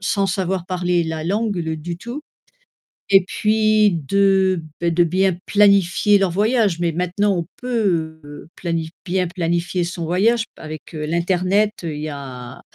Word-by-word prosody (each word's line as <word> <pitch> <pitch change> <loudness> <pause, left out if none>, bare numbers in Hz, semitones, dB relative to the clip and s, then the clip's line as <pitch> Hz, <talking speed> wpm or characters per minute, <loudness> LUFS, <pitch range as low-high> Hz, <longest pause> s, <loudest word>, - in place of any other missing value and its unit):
sans 195 0 0
savoir 185 -2 -2
parler 180 -2 0
la 160 -1 -4
langue, 205 +3 -1
le 160 -2 -2
du 170 +2 -6
tout 240 - -7 0.9
et 195 -2 +6
puis, 215 0 +2
de, 190 -1 +3 0.2
beh, 170 -1 +1
de 175 +1 +3
bien 185 +1 +1
planifier 200 0 +4
leur 195 -1 +1
voyage, 205 -1 +1
mais 170 -1 +1
maintenant 180 +3 0
on 170 - -2
peut, 185 -11 -1
heu, 145 +2 -11
planif 165 -2 -2 0.2
bien 180 0 0
planifier 175 0 -1
son 175 -1 -5
voyage 215 +8 +2
avec, 155 +1 -9
heu, 150 -1 -4
l'internet, 180 +5 +1
il 155 -3 -4
y 155 - -3
a 130 -4 -8
180 Hz, 155 wpm, -20 LUFS, 165-200 Hz, 0.9 s, et